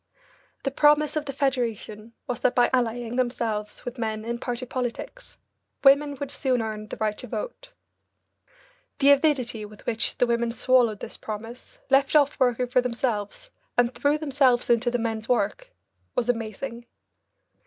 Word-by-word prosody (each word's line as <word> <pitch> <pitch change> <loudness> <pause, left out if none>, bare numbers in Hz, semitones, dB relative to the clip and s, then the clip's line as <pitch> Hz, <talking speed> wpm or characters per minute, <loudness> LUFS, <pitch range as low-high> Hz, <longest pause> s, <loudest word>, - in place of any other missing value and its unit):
The 275 - -1
promise 295 +2 +4
of 305 -1 -1
the 280 - -3
Federation 235 -5 -2
was 245 - -3
that - - +1
by 245 - +4
allying 240 -1 0
themselves 230 -4 -2
with 245 0 -6
men 220 -1 -3
in 235 +1 -3
party 245 +1 -3
politics, 255 - -5 0.5
women 285 +1 +5
would 280 0 -5
soon 260 -3 0
earn 215 -1 -4
the - - -7
right 215 -1 0
to - - -7
vote. - - -6 1.2
The 280 0 +6
avidity 270 -6 +2
with 210 0 -12
which 225 -1 -1
the - - +4
women 235 -1 0
swallowed 245 -4 +3
this - - -7
promise, 225 - -8
left 275 +2 +4
off 290 -1 +4
working 250 -1 +2
for 250 +1 +2
themselves, 235 - -2 0.3
and 245 0 +3
threw 290 +1 +1
themselves 270 -5 +2
into 235 +1 +3
the 245 - 0
men's 225 -1 -3
work 245 - 0 0.5
was 245 -1 0
amazing. 235 +1 -3
245 Hz, 155 wpm, -25 LUFS, 225-275 Hz, 1.2 s, The